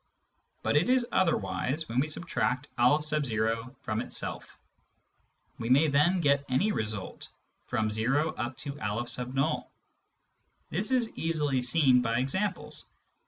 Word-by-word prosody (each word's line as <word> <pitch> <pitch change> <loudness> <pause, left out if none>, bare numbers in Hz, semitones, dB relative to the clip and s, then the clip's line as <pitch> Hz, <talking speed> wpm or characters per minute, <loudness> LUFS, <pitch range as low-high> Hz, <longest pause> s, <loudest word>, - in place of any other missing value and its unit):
But - - +1
it 170 +11 +2
is 255 -1 +3
otherwise 135 - 0
when 120 +2 -1
we 145 - +1
subtract 150 -4 -1
N 125 +5 +5 0.9
from 110 +1 -2
itself; - - -4 1.0
we 115 0 -3
may 140 +5 +5
then 160 +6 +3
get 140 -2 +3
any 175 +12 +2
result, 105 - -4 0.4
from 110 -1 0
o 135 +8 +1
up 120 -1 -4
to 140 0 -6
N. 125 +6 -1 1.1
This 195 +8 0
is 250 -3 +1
easily 150 -5 0
seen 125 0 +5
by 115 -1 0
examples. 190 +12 -2
140 Hz, 120 wpm, -29 LUFS, 120-160 Hz, 1.1 s, N